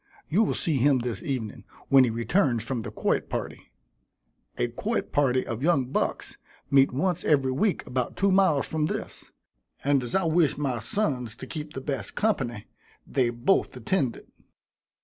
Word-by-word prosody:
You 190 +8 +3
will 220 - +1
see 155 -4 0
him 135 +2 +4
this 120 -4 -3
evening, 120 -7 -4 0.3
when 135 -1 +7
he - - 0
returns 120 - +1
from 120 0 -3
the - - -6
quoit - - -1
party. - - -5 0.9
A 120 - +1
quoit 210 - -3
party 130 -3 +2
of 115 -1 -4
young 150 -4 +3
bucks - - -2 0.3
meet 135 -1 +5
once 175 +6 0
every 135 -4 +2
week 195 +9 0
about 125 -1 -3
two 200 0 +3
miles 185 -7 +3
from 155 -1 0
this, - - -6 0.5
and 140 -1 +3
as 120 -1 -4
I 190 - +3
wish 165 -2 +2
my 135 -5 -1
sons 125 - -2
to 130 - -9
keep 150 +2 -7
the 135 - -5
best 130 -8 -4
company, 120 - -1 0.4
they 130 -3 +1
both 120 +11 +1
attend 185 - 0
it. - - -15
135 Hz, 170 wpm, -26 LUFS, 120-165 Hz, 0.9 s, when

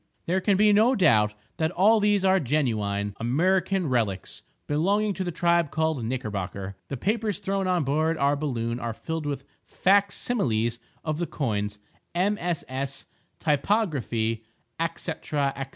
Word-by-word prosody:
There 185 +3 +1
can 200 0 +2
be 210 +1 +5
no 225 +6 +5
doubt 105 - +4 0.2
that 160 0 +1
all 205 +6 +4
these 205 -2 +2
are 190 0 +5
genuine 110 - 0
Amriccan 180 +8 +1
relics 110 -8 -1 0.2
belonging 200 +8 +1
to 190 - -3
the 175 - -2
tribe 170 -2 +2
called 160 -5 0
Knickerbocker. 100 -5 -4
The 135 - -4
papers 210 - 0
thrown 195 -1 -1
on 180 -3 +2
board 155 +4 +1
our 140 0 +2
balloon 120 -5 -2
are 115 -2 -4
filled 160 +1 -4
with 140 -1 -3 0.2
fac 200 +1 +3
similes 120 - 0 0.3
of 155 -1 -1
the 175 - -1
coins, 105 -7 -2 0.4
MSS., 170 -8 -1 0.3
typography, 140 - 0 0.5
&c., 170 - -4
&c. 150 - -3
155 Hz, 140 wpm, -26 LUFS, 120-190 Hz, 0.5 s, be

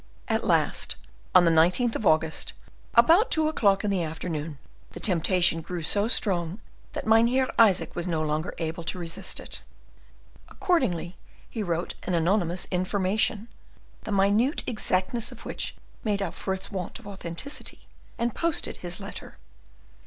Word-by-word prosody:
At - - 0
last, - - +1 0.4
on 180 -1 +8
the 165 - +5
19th 180 +9 +3
of 215 - 0
August, 160 0 +1 0.4
about 330 - +6
two 315 -1 +2
o'clock 200 -10 +2
in 205 - 0
the 190 -3 +1
afternoon, 160 -2 -4 0.4
the - - -7
temptation 175 -2 +2
grew 170 +1 -5
so 205 +6 +2
strong, 185 -5 +1 0.3
that - - -4
Mynheer 235 +4 +4
Isaac 215 -5 +4
was 175 +1 -3
no 160 -3 0
longer 155 +2 -2
able 165 +1 -3
to 185 - -1
resist 170 -2 -3
it. - - -8 0.9
Accordingly, 185 - 0 0.3
he 225 - -5
wrote 170 -3 -2
an 180 - -1
anonymous 175 +1 +1
information, 200 +4 +1 0.5
the - - -6
minute 205 - +2
exactness 215 0 -1
of - - -12
which - - -4 0.3
made 205 -2 0
up 170 - -4
for 190 - -2
its 190 +3 -6
want 185 -3 -4
of - - -16
authenticity, 195 - -5 0.3
and 235 -1 -1
posted 335 -1 -1
his 175 -1 -4
letter. - - -8
190 Hz, 150 wpm, -27 LUFS, 170-220 Hz, 0.9 s, on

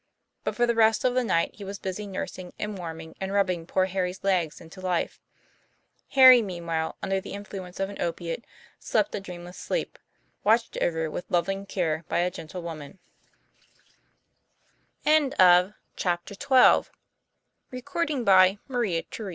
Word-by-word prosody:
But - - -2
for 240 - +3
the 235 - +1
rest 225 0 +3
of 250 - +3
the 255 0 +2
night 170 -7 +1
he 205 - -11
was 200 +1 -6
busy 195 +2 -5
nursing 185 -2 -6
and 210 0 -4
warming 160 -3 -7
and 190 0 -3
rubbing 185 -4 0
poor 185 0 +2
Harry's 185 0 -3
legs 180 -5 0
into 170 +3 -13
life. 180 -2 -1 1.0
Tom, 255 -3 +9
meanwhile, 170 -4 -3
under 195 0 0
the - - -8
influence 195 -3 -8
of 195 - 0
an 200 - -8
opiate, 170 +5 -3 0.4
slept 300 - 0
a - - -2
dreamless 180 -2 -9
sleep, - - -3 0.4
watched 225 +2 +2
over 160 -2 0
with 175 - -6
loving 195 +3 -1
care 165 -4 -1
by - - -1
a 180 +1 +1
gentle 170 +2 -8
woman. 160 +1 -8
185 Hz, 125 wpm, -26 LUFS, 170-200 Hz, 1.0 s, Tom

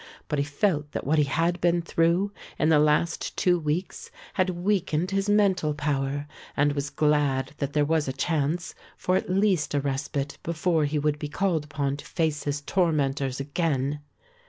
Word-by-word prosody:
But 150 - 0
he 140 - +1
felt 145 0 0
that - - -3
what 155 +2 +2
he 150 - +4
had 165 +5 0
been 175 0 +2
through 170 +4 +2 0.3
in 155 - +2
the 155 -2 +5
last 150 +3 +1
two 175 -1 +3
weeks 160 +4 -3 0.2
had 185 -1 +1
weakened 180 -2 0
his 195 +1 0
mental 190 -7 +3
power 145 -1 -1 0.3
and 145 0 +3
was 140 0 -2
glad 145 -3 +1
that 140 -1 -2
there 150 -1 +3
was 155 -1 +1
a - - 0
chance 155 +4 -1 0.2
for 185 - 0
at 185 - -1
least 185 -6 +2
a - - +3
respite 140 +1 -3
before 165 -1 +1
he 150 +1 -1
would 150 0 0
be 150 - -4
called 165 -2 0
upon 145 -2 -2
to - - -10
face 155 -3 -1
his 145 0 -1
tormentors 145 -6 0
again. 145 -1 -1
150 Hz, 180 wpm, -26 LUFS, 145-175 Hz, 0.3 s, the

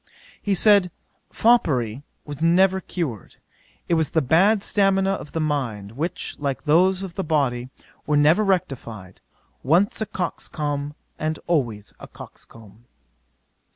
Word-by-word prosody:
'He 200 -1 0
said, 200 -1 +5 0.4
foppery 135 - +2 0.2
was 145 0 -8
never 190 +3 +3
cured; 140 - -5 0.5
it - - 0
was 160 -2 +2
the 160 - +1
bad 195 - +3
stamina 195 -1 +2
of 190 -6 -6
the 165 - -2
mind, 125 -10 -2
which, 155 +9 -4
like 140 -2 -3
those 180 +5 +3
of 190 -3 -7
the 195 - -3
body, 130 -6 0 0.4
were 150 - +2
never 155 +8 +4
rectified: 135 - -3 0.4
once 180 +11 +2
a 220 - -1
coxcomb, 145 -5 -4 0.2
and 155 0 -2
always 120 -11 -1
a - - -10
coxcomb. 110 0 -14
155 Hz, 130 wpm, -23 LUFS, 130-190 Hz, 0.5 s, said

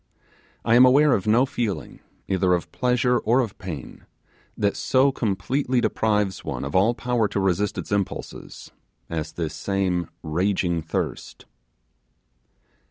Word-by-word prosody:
I 115 - +3
am 120 +2 +8
aware 140 +3 +6
of 100 -2 -1
no 115 +5 +4
feeling, 110 - -4 0.3
either 95 -1 +2
of 85 - -5
pleasure 125 -1 +1
or 120 +4 +2
of 115 -6 -2
pain, 80 -8 -8 0.5
that 100 -1 +1
so 135 +1 +3
completely 125 +3 -1
deprives 105 -5 0
one - - -4
of 70 - -6
an 105 +6 +3
power 120 -3 0
to 100 - -2
resist 95 +1 0
its - - -6
impulses, 100 -2 -4 0.4
as 80 -1 -3
this 80 -3 -3
same 95 -3 -1
raging 85 +1 0
thirst. 80 - -4
100 Hz, 135 wpm, -24 LUFS, 90-125 Hz, 0.5 s, am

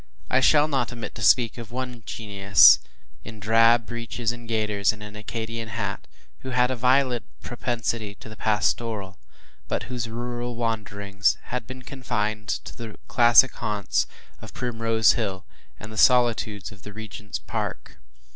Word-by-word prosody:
I 125 - +4
shall 150 +2 +5
not 135 -5 -1
omit 120 -2 -7
to 115 - -9
speak 115 +3 +4
of 115 -2 -8
one 125 -1 -5
genius, 100 -3 +5 0.4
in 110 -1 -10
drab 115 +2 +4
breeches 115 0 -3
and 120 -1 -10
gaiters, 105 -3 +1
and 105 -1 -11
an 105 0 -10
Arcadian 115 +1 -5
hat, 100 -2 -4 0.3
who 130 - -7
had 125 0 +2
a - - -1
violent 125 0 +2 0.2
propensity 115 -3 -3
to - - -13
the 110 - -10
pastoral, 105 -1 -1 0.5
but - - -2
whose 120 -3 -4
rural 120 +1 -4
wanderings 105 -3 -1
had 125 -1 -5
been 130 0 -9
confined 110 -5 -3
to - - -4
the 115 -2 -8
classic 120 +1 +6
haunts 105 -2 -1 0.3
of - - -11
Primrose 115 -2 +2
Hill, 100 -5 -3 0.3
and 110 - -9
the - - -9
solitudes 115 -6 +3
of 100 -2 -14
the 105 - -10
Regent’s 105 -2 -7
Park. - - -5
115 Hz, 155 wpm, -25 LUFS, 105-120 Hz, 0.5 s, classic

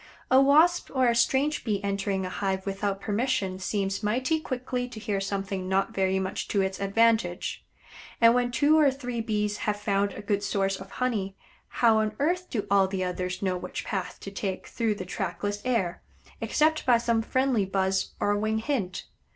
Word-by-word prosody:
A 260 +1 +7
Wasp 315 +6 +4
or 260 -1 +4
a 235 - +2
strange 270 +5 +2
Bee 210 -4 0
entering 195 -1 -1
a - - -3
hive 190 0 -2
without 195 0 -2
permission 205 -3 -1
seems 195 0 -2
mighty 255 +9 +1
quickly 250 -3 -3
to 230 - -8
hear 205 -3 -2
something 195 -1 -3
not 195 +1 +1
very 190 0 +1
much 190 0 -3
to 200 - +1
its 190 0 -3
advantage, 200 -2 +1 0.6
and 230 0 +7
when 245 0 +1
two 290 +6 +4
or 295 -2 +6
three 250 -3 -4
Bees 210 -2 -1
have 210 -1 -2
found 200 -1 0
a 205 - -8
good 205 -1 0
source 195 -1 0
of 190 +1 -10
honey, 210 -6 -2 0.3
how 230 -2 +3
on 215 0 -1
earth 355 +5 0
do 210 -4 -2
all 195 -1 +5
the 190 -1 -2
others 180 +1 -3
know 185 -1 +1
which 180 0 -6
path 190 -4 -4
to 195 - -7
take 195 -1 -4
through 225 -3 -1
the 185 - -6
trackless 205 +3 -3
air, 195 -9 0 0.4
except 310 +1 +2
by 245 -2 +5
some 230 -1 +1
friendly 255 -1 +1
buzz 190 0 -1
or 205 - +2
wing 215 +1 0
hint? 220 -7 -2
205 Hz, 185 wpm, -27 LUFS, 195-245 Hz, 0.6 s, A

